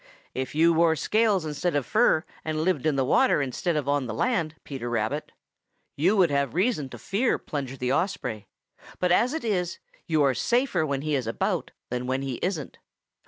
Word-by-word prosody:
If 130 +1 -4
you 165 +2 +5
wore 165 0 +4
scales 210 -1 +2
instead 155 +2 -1
of 145 -3 +1
fur, 215 -7 +3 0.2
and 155 0 -1
lived 165 -5 +1
in 150 - +2
the 135 -1 +1
water 255 - +4
instead 145 +5 -1
of 150 -3 -1
on 140 -2 +1
the 110 - -4
land, 165 - 0
Peter 130 -4 -5
Rabbit, 120 +6 -2 0.6
you 180 +9 +2
would 180 -5 +4
have 140 -1 0
reason 180 - +1
to - - -9
fear 230 +6 0
Plunger 135 -3 -5
the 125 +1 0
Osprey, 140 - -2 0.5
but 180 -1 +1
as 240 +8 +4
it 320 - -3
is, 185 -6 -1 0.3
you 155 -3 +3
are 135 -2 +3
safer 240 - +1
when 140 -1 -2
he 155 0 -1
is 130 -5 0
about 115 - -1 0.2
than 125 0 -2
when 130 +1 -1
he 130 -3 -3
isn't. 170 -7 -3
155 Hz, 195 wpm, -26 LUFS, 135-180 Hz, 0.6 s, you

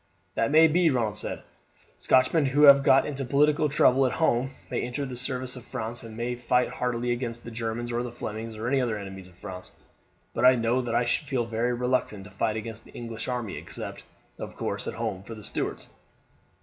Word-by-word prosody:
"That 115 - +1
may 160 +2 +7
be," 170 +2 +3
Ronald 115 -7 0
said. - - -4 0.6
"Scotchmen 130 +4 +3
who 145 +3 +3
have 140 -1 +9
got 135 0 +5
into 140 -2 -3
political 145 +3 +3
trouble 135 -2 +4
at - - -2
home 135 -5 +2 0.2
may - - 0
enter 130 +3 -3
the 130 -2 -6
service 125 0 -2
of 125 - -9
France, 115 +2 -4
and 110 -1 -10
may 120 +1 -2
fight 125 +1 +1
heartily 125 -1 -1
against 120 -1 -3
the 115 - -8
Germans 115 +1 -3
or 120 0 0
the 120 -1 -4
Flemings, 110 -1 -6
or 110 +2 -4
other 125 -5 +1
enemies 95 -2 -8
of 90 - -19
France; 90 0 -9 0.6
but - - -2
I 130 0 +8
know 120 +2 +1
that 120 -2 -2
I 120 - +3
should 145 +5 0
feel 130 -4 0
very 115 +2 0
reluctant 125 -4 -1
to 105 - -13
fight 105 +2 -1
against 110 0 -6
the - - -17
English 115 -1 -6
army, 120 -5 -3
except, - - -7 0.4
of - - -7
course, - - -3
at - - -4
home 95 - -3
for 115 +4 -9
the 105 - -11
Stuarts." - - -3
120 Hz, 210 wpm, -27 LUFS, 115-130 Hz, 0.6 s, have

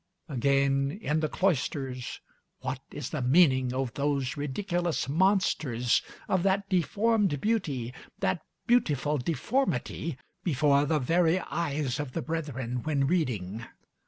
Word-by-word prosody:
Again, 140 +2 +1
in 155 -7 0
the 155 -1 0
cloisters, 135 -8 -1 0.4
what 130 - -3
is 145 -4 -6
the 150 - -2
meaning 130 -2 +4
of 130 -2 -2
those 140 -1 0
ridiculous 170 +4 -1
monsters, 150 - +2 0.3
of 185 - +2
that 195 +1 +1
deformed 200 -1 +2
beauty, 145 - -1 0.2
that 175 - 0 0.2
beautiful 150 - +2
deformity, 165 - -1 0.3
before 145 -3 +3
the 155 +1 +2
very 165 +5 +3
eyes 145 -6 -2
of 145 -4 -4
the 165 - -2
brethren 130 -7 -3
when 145 -2 +1
reading? 120 - -1
145 Hz, 120 wpm, -29 LUFS, 130-175 Hz, 0.4 s, meaning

